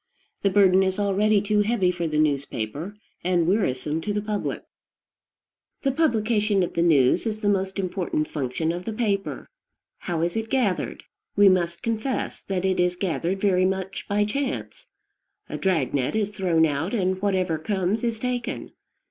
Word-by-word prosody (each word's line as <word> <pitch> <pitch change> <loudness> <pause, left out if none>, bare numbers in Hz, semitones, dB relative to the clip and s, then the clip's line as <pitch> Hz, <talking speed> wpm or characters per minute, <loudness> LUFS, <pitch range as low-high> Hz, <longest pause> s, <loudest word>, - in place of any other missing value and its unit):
The 200 - +3
burden 190 -1 +5
is 190 0 0
already 205 +1 +2
too 210 0 +2
heavy 205 -4 +2
for 170 -2 -3
the 155 -1 -2
newspaper, 145 - -1 0.3
and 175 -2 +2
wearisome 160 - 0
to 210 - -3
the 210 - -1
public. 210 -1 -3 1.2
The 275 - +2
publication 215 - +2
of 175 - -3
the 170 - 0
news 150 - +4
is 215 -1 -3
the 205 - +2
most 190 -1 0
important 180 -5 -1
function 150 +3 -2
of 175 +1 -5
the 225 - -3
paper. 205 -3 -2 0.5
How 170 -2 -2
is 170 0 -1
it 225 0 -2
gathered? 240 -9 0 0.3
We 205 -1 +7
must 170 -1 0
confess 230 +3 -2
that 190 -1 -2
it 190 -1 +1
is 180 0 +2
gathered 180 0 -1
very 190 -2 +3
much 190 0 -3
by 205 +1 +2
chance. 275 - -4 0.6
A - - -5
drag 165 -10 +1
net 135 +6 0
is 210 -2 0
thrown 180 -5 +2
out, 155 +8 -1
and 185 -2 0
whatever 185 -5 0
comes 195 +5 -1
is 230 -2 0
taken. 250 -1 -3
190 Hz, 165 wpm, -24 LUFS, 170-210 Hz, 1.2 s, We